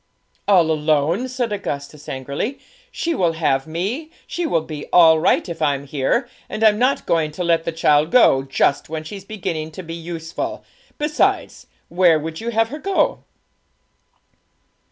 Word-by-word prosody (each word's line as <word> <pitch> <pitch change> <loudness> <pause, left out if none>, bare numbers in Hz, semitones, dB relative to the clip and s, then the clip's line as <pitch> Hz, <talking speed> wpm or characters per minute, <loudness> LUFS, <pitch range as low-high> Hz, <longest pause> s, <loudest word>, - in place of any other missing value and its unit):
'All 175 -5 +5
alone?' 155 - +1
said 245 -4 -2
Augustus 145 -6 -5
angrily; 140 - -4 0.3
'she 335 -7 -2
will 175 - +1
have 145 -4 0
me, 200 - -3 0.2
she 345 -1 -3
will 165 - +1
be 155 -2 -7
all 160 -2 +6
right 160 - +2
if 165 -2 -6
I'm 140 -2 0
here; 145 - 0 0.2
and 220 - -3
I'm 215 -1 +5
not 255 +3 +1
going 160 -2 +1
to 180 - -3
let 165 -1 +2
the - - -1
child 150 -1 +3
go, 170 - +5
just 140 +1 0
when 160 0 -4
she's 195 +4 -9
beginning 175 -7 -4
to 185 - -7
be 165 0 -7
useful. 165 0 -5 0.3
Besides, 300 +1 0 0.2
where 175 -2 +4
would 160 +3 -5
you 230 - -3
have 225 0 +1
her 300 +4 -6
go?' 390 +4 0
165 Hz, 160 wpm, -20 LUFS, 155-215 Hz, 0.3 s, all